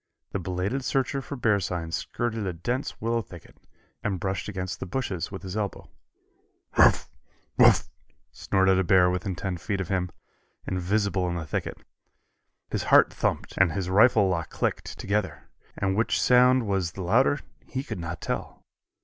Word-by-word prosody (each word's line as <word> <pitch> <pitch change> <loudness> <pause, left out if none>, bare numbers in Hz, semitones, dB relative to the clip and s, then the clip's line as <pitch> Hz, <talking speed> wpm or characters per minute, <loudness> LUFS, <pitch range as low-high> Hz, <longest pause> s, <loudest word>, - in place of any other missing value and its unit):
The 100 - -2
belated 95 +9 -2
searcher 135 +1 0
for 140 +3 -7
bear 110 -5 +2
signs 85 -3 -3
skirted 115 -4 -3
a 90 - -2
dense 120 - -3
willow 115 +1 0
thicket, 90 -6 -13 0.5
and 95 -4 -1
brushed 95 +2 -3
against 95 -2 -4
the - - -5
bushes 95 -5 -3
with 95 0 -7
his 95 0 -6
elbow. 105 -2 -4 0.8
"Woof! - - +5 0.5
Woof!" - - +6 0.4
snorted 95 -1 +2
a - - +2
bear 90 0 +5
within 90 +1 -2
ten 90 0 -3
feet 95 +5 -3
of 95 - -4
him, 90 -2 0 0.6
invisible 95 0 0
in 85 - -2
the 85 -2 -4
thicket. - - -3 0.9
His - - -2
heart - - +6
thumped - - -2
and 95 -4 +4
his 95 0 -2
rifle 105 0 +5
lock 85 -3 -1
clicked, - - -3
together, 105 +2 -2 0.3
and 95 0 0
which 110 +3 +1
sound 125 0 +5
was 95 -4 -1
the 95 - -6
louder 125 +10 +3 0.3
he 130 0 -3
could 140 - -6
not 85 -1 -5
tell. - - -5
95 Hz, 165 wpm, -26 LUFS, 90-110 Hz, 0.9 s, Woof